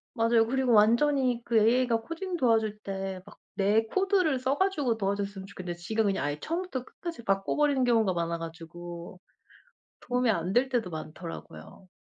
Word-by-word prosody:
맞아요. 230 Hz, -1 st, +3 dB
그리고 260 Hz, +1 st, +1 dB
완전히 245 Hz, +3 st, +3 dB
그 230 Hz, -1 st, +2 dB
AI가 230 Hz, +1 st, +3 dB
코딩 350 Hz, +7 st, -4 dB
도와줄 225 Hz, -7 st, +2 dB
때 195 Hz, -2 st, -4 dB
막 205 Hz, -, -15 dB, 0.2 s
내 205 Hz, +2 st, +3 dB
코드를 375 Hz, -, +1 dB
써가지고 275 Hz, -1 st, +1 dB
도와줬으면 200 Hz, -1 st, -2 dB
좋겠는데 185 Hz, -3 st, -6 dB
지가 220 Hz, +6 st, -1 dB
그냥 195 Hz, -6 st, 0 dB
아예 145 Hz, +1 st, -2 dB
처음부터 335 Hz, -7 st, -3 dB
끝까지 335 Hz, -8 st, -7 dB
바꿔버리는 255 Hz, +7 st, +1 dB
경우가 225 Hz, -6 st, +3 dB
많아 170 Hz, 0 st, -1 dB
가지고 170 Hz, +2 st, -9 dB, 0.8 s
도움이 250 Hz, 0 st, 0 dB
안 180 Hz, -2 st, -1 dB
될 250 Hz, +5 st, +3 dB
때도 240 Hz, -8 st, -1 dB
많더라고요. 80 Hz, -, -9 dB
225 Hz, 375 characters per minute, -28 LUFS, 190-255 Hz, 0.8 s, 맞아요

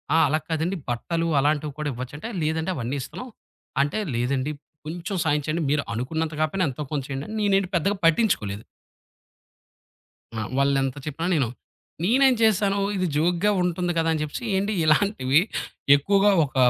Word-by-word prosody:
"ఆ! -, -, +5 dB
అలా 155 Hz, +3 st, +1 dB
కాదండి 165 Hz, +4 st, -1 dB
బట్టలు 165 Hz, +8 st, -1 dB
అలాంటివి 150 Hz, 0 st, 0 dB
కూడా 150 Hz, -1 st, -1 dB
ఇవ్వచ్చు" 130 Hz, +4 st, -7 dB
అంటే 225 Hz, -, -6 dB
లేదండి 160 Hz, +3 st, 0 dB
అవన్నీ 130 Hz, +2 st, -3 dB
ఇస్తున్నాం 250 Hz, -, -7 dB, 0.5 s
అంటే, 145 Hz, +9 st, -2 dB, 0.2 s
"లేదండి 130 Hz, +4 st, 0 dB, 0.3 s
కొంచెం 175 Hz, +4 st, -4 dB
సాయం 150 Hz, 0 st, +2 dB
చేయండి 160 Hz, +1 st, -1 dB
మీరు 150 Hz, -1 st, +1 dB
అనుకున్నంత 160 Hz, +6 st, -2 dB
కాకపోయినా 180 Hz, +4 st, +1 dB
ఎంతో 145 Hz, +3 st, -6 dB
కొంత 145 Hz, -3 st, -1 dB
చేయండి." 135 Hz, +1 st, -4 dB
నేనేంటి 195 Hz, -2 st, +2 dB
పెద్దగా 200 Hz, +4 st, +1 dB
పట్టించుకోలేదు. 135 Hz, -, +2 dB, 1.8 s
ఆ! -, -, -1 dB, 0.2 s
వాళ్ళు 140 Hz, 0 st, +3 dB
ఎంత 135 Hz, +1 st, -3 dB
చెప్పినా 165 Hz, +4 st, -3 dB
నేను 135 Hz, -6 st, +2 dB, 0.6 s
నేనేం 260 Hz, +5 st, +4 dB
చేశాను 200 Hz, -2 st, +3 dB, 0.2 s
ఇది 185 Hz, -1 st, 0 dB
జోక్‌గా 175 Hz, +6 st, +2 dB
ఉంటుంది 180 Hz, 0 st, 0 dB
కదా! 165 Hz, 0 st, +2 dB
అని 155 Hz, -, -2 dB
చెప్పేసి 155 Hz, +11 st, -5 dB
ఏండి 200 Hz, +2 st, 0 dB
ఇలాంటివి 155 Hz, -3 st, +3 dB, 0.5 s
ఎక్కువగా 200 Hz, +7 st, +3 dB
ఒక 135 Hz, -, -13 dB
160 Hz, 150 wpm, -24 LUFS, 140-190 Hz, 1.8 s, ఆ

